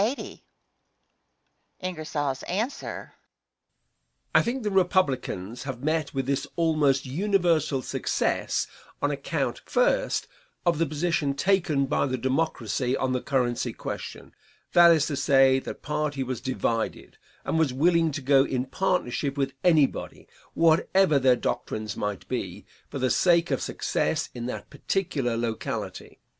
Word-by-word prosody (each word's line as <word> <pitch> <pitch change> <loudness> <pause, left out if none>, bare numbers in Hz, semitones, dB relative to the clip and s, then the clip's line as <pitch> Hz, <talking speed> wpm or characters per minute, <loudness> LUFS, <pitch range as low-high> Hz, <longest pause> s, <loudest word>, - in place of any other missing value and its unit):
Answer. 220 +9 -4 1.2
I - - +6
think 245 +1 -2
the 210 - -1
Republicans 140 - 0
have 130 -2 -6
met 155 -1 0
with 135 -2 -2
this 140 +1 -1
almost 155 -5 +2
universal 165 -3 +1
success - - -1 0.3
on - - +1
account, - - -2
first, - - +1 0.4
of 170 -3 +2
the 165 - +2
position 155 -1 0
taken 165 -4 +2
by 140 +1 +1
the 130 -1 -1
Democracy 130 -2 0
on 130 -1 0
the 125 -1 0
currency 125 -3 0
question; - - -7 0.4
that 175 -1 +8
is 160 -3 +4
to 145 - -2
say, 135 -1 +4
that - - -8
party 150 -2 -1
was 130 -2 -4
divided, 115 -3 -2 0.3
and 160 - 0
was 155 -5 +2
willing 165 +4 +3
to 145 -2 -5
go 135 0 +5
in 130 -2 -2
partnership 140 -3 -1
with 135 -1 -1
anybody, 155 -6 +2 0.3
whatever 165 0 +4
their 130 -1 +5
doctrines 110 -3 -3
might 105 -2 -4
be, - - -4 0.2
for - - -5
the 130 -1 +1
sake 170 -2 +3
of - - 0
success - - -1
in 120 0 -5
that 125 - -6
particular 145 -12 -1
locality. 115 -1 -4
140 Hz, 130 wpm, -26 LUFS, 130-170 Hz, 1.2 s, that